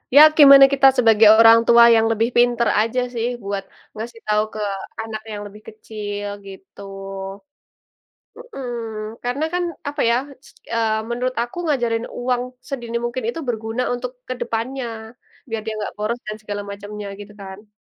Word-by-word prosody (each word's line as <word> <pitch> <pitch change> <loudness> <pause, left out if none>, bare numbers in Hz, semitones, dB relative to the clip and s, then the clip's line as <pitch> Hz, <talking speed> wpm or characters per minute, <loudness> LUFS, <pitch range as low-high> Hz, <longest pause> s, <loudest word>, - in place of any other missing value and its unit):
Ya, 285 - +9 0.2
gimana 275 -2 +10
kita 275 0 +4
sebagai 225 -3 +6
orang 225 0 +8
tua 235 0 +7
yang 225 0 +3
lebih 225 +1 +1
pinter 240 -1 +3
aja, 230 +3 0
sih, 235 +1 -1 0.2
buat 200 -1 -3 0.3
ngasih 230 +1 -8
tau 210 0 +2
ke 215 - -5 0.4
anak 220 -1 -7
yang 205 -1 -6
lebih 210 +1 -13
kecil 205 -1 -7 0.2
gitu. 195 0 -13 1.6
Mhm, 485 - -9 0.6
karena, 250 +5 -2
kan, 360 - 0 0.3
apa, 290 0 -4
ya, 235 - +3 0.3
s - - -16 0.3
eee, 220 -1 +1
menurut 250 +2 -2
aku 240 +7 -10
ngajarin 240 -6 0
uang 245 0 0 0.3
sedini 240 -4 -4
mungkin 240 +1 -4
itu 240 - -5
berguna 225 +1 -2
untuk 245 0 -4 0.2
kedepannya, 245 +1 -3 0.6
biar 225 -1 -3
dia 220 - -3
gak - - -6
boros 215 +3 -2
dan 215 0 -5
segala 205 -1 -5
macamnya 205 +1 -8
gitu, 205 0 -10
kan. 195 +2 -11
230 Hz, 155 wpm, -21 LUFS, 215-245 Hz, 1.6 s, gimana